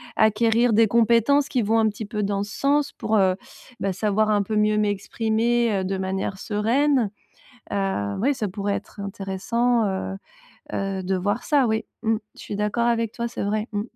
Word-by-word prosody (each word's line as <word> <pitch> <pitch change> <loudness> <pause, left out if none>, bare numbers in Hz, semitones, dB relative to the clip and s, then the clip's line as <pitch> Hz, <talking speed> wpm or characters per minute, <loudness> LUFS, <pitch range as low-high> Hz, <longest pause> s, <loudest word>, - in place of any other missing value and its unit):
acquérir 225 +2 +3
des 225 +1 +5
compétences 235 +5 +3
qui 250 - 0
vont 220 +1 +2
un 220 -1 +4
petit 210 +1 -6
peu 210 0 -3
dans 200 0 -1
ce 205 - -8
sens. 285 +1 +2
Pour, 220 - +1
heu, 190 -2 +3 0.4
bah 195 -1 -1
savoir 215 +2 +1
un 205 -1 +3
peu 215 +2 -3
mieux 210 0 +3
m'exprimer, 220 +3 +1
heu, - - -3
de 190 +1 -2
manière 190 0 -2
sereine. 230 +3 +1 0.6
Heu, 190 - -1
oui 275 +6 +2
ça 235 -5 -2
pourrait 200 +2 -2
être 200 - -7
intéressant, 205 +5 0
heu 140 - -3 0.6
heu, 195 -1 -2
de 190 +1 0
voir 205 +5 -1
ça, 285 -4 +3
oui. 220 0 0 0.2
Mmh. 225 -1 +2 0.2
Je - - -14
suis 205 - -5
d'accord 210 +3 0
avec 230 -2 +1
toi, 235 0 -3
c'est 235 - -4
vrai. 215 +2 -1
Mmh. 205 -1 -1
215 Hz, 190 wpm, -24 LUFS, 200-235 Hz, 0.6 s, des